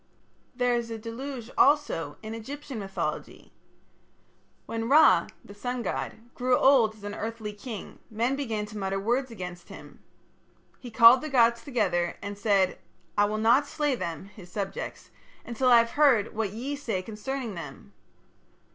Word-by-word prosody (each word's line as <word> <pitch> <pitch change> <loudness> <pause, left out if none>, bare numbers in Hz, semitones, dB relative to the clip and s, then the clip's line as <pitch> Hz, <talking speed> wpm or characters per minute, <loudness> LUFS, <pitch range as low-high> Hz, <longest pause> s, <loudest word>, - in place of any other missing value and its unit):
There 245 -1 +1
is 235 -1 -1
a 225 - -4
deluge 240 +2 -7
also 265 - +2
in 220 +1 -6
Egyptian 270 +2 -7
mythology. 195 -1 -5 1.1
When 225 +1 -3
Ra, 300 +3 +6 0.2
the 200 - -11
sun 245 +4 -4
god, 235 +2 -5
grew 250 0 +2
old 245 -6 +4
as 210 - -18
an 205 0 -5
earthly 220 -1 -5
king, 210 0 -8
men 235 +5 0
began 225 -7 -3
to 210 0 -8
mutter 195 0 -2
words 245 +6 0
against 180 -5 -8
him. - - -12 0.8
He 245 - -9
called 230 +2 +7
the 310 - -5
gods 235 -3 +3
together 185 - 0
and 200 0 -6
said: 200 -2 +1 0.4
"I 205 - +4
will 210 +1 -2
not 235 +6 +4
slay 295 -1 0
them 170 -7 -4
(his 195 -3 -14
subjects) 195 -1 -5 0.3
until 245 +2 0
I 240 - +8
have 230 0 +3
heard 275 -9 +3
what 215 -2 -2
ye 255 +7 -4
say 225 -10 -3
concerning 230 +3 -5
them." 170 -4 -9
230 Hz, 155 wpm, -27 LUFS, 205-255 Hz, 1.1 s, I